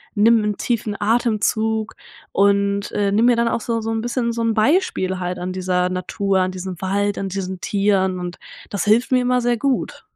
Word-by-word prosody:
nimm 225 +2 +5
'n 210 -1 -1
tiefen 215 -3 -2
Atemzug 220 0 0 0.4
und 200 0 +2
äh, 200 -1 +1
nimm 215 +4 +3
mir 245 -1 +5
dann 235 0 +1
auch - - -1
so 230 0 -2
so 225 +1 -3
'n 225 - -1
bisschen 240 0 -1
so 230 0 -3
'n 230 -1 +1
Beispiel 215 - +1
halt 180 0 -3
an 180 +1 -4
dieser 180 -1 0
Natur, 190 +2 -1
an 185 0 +1
diesem 185 -1 -6
Wald, 200 +2 0
an 195 - -2
diesen 190 -1 -4
Tieren, 195 -2 +1
und 175 -1 -6 0.3
das 200 -2 -2
hilft 225 +5 +3
mir 255 - +4
immer 250 0 +1
sehr 240 0 +1
gut. 275 - -1
205 Hz, 200 wpm, -20 LUFS, 190-230 Hz, 0.4 s, nimm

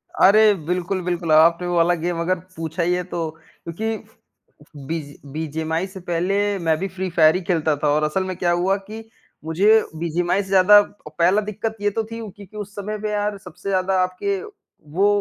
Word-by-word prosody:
अरे! 215 +2 +6
बिल्कुल, 180 +2 -1
बिल्कुल, 175 -2 -2
आपने 170 +3 +5
वो 175 - -1
वाला 170 +1 +4
गेम 175 -1 -1
अगर 180 +1 0 0.2
पूछा 165 +1 -3
ही 175 +1 +1
है 180 0 -1
तो 165 -2 -4
क्योंकि 220 +7 -5 0.9
बीज 155 -3 -5 0.2
बीजीएमआई 160 +3 -2
से 190 0 -10
पहले 175 +2 -1 0.3
मैं 160 -1 +3
भी 195 - -2
फ्री 185 0 -4
फायर 155 0 +6
ही 185 - -1
खेलता 160 -4 +1
था 150 - +3
और 155 - +1
असल 170 +5 0
में 185 0 -4
क्या 175 -2 +1
हुआ 180 +3 +2
कि 225 +1 -7 0.4
मुझे 205 +7 +4
बीजीएमआई 175 +4 0
से - - -12
ज़्यादा 195 +2 +7 0.3
ओ - - -7
पहला 185 +5 +4
दिक्कत 210 +1 -4
ये 205 - +2
तो 225 +2 -1
थी 230 - -5 0.2
क्योंकि 205 +2 -13
उस 205 -1 -6
समय 210 +1 -4
पे 215 0 -3
यार 205 -1 -1
सबसे 195 - -8
ज़्यादा 190 0 +1
आपके 385 - -2 0.5
वो 200 +2 +4
185 Hz, 195 wpm, -22 LUFS, 165-200 Hz, 0.9 s, ज़्यादा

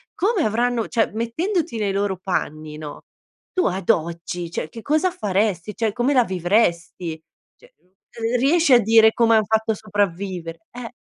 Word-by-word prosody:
Come 405 -1 +1
avranno 235 +1 0
cioè, 225 - 0
mettendoti 260 - -2
nei 205 -2 0
loro 195 -1 -1
panni, 155 -4 -4
no, 150 -1 -9 0.5
tu 365 - 0
ad 185 0 -2
oggi 170 +1 -1
cioè 155 - -4
che 230 - -10
cosa 310 +8 +1
faresti? 205 - -1
Cioè 225 -2 0
come 245 +5 +1
la 250 -3 +5
vivresti? 175 -3 0 0.4
Cioè, - - -21
ehm, 225 +6 -5
riesci 290 +2 +4
a 240 - +8
dire: 220 +1 +5
"Come 230 -1 +4
han 215 - +3
fatto 220 +1 +1
a - - -1
sopravvivere?" 190 -5 -3
Eh. 245 -1 -8
215 Hz, 165 wpm, -22 LUFS, 180-240 Hz, 0.5 s, a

